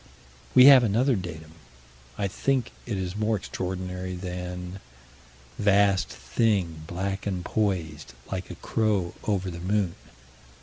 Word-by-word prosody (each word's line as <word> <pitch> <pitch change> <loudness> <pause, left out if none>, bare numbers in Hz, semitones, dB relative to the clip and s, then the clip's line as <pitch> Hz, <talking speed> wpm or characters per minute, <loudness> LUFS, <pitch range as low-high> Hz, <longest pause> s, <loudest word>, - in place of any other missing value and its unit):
We 130 0 +10
have 135 -3 +10
another 120 +5 +2
datum. 85 -5 -6 0.7
I 100 - 0
think 130 +6 0 0.2
it 105 -4 -2
is 95 0 -3
more 110 +1 +1
extraordinary 90 -1 -4
than 90 0 -6 0.8
Vast 100 -2 +3
thing, 85 - 0
black 95 +4 -3
and 90 -3 -2
poised, 85 - -2 0.2
like 95 -1 -4
a 90 - -7
crow, 100 -3 0
over 95 -3 0
the 85 - -7
moon. 95 0 0
95 Hz, 125 wpm, -26 LUFS, 90-105 Hz, 0.8 s, We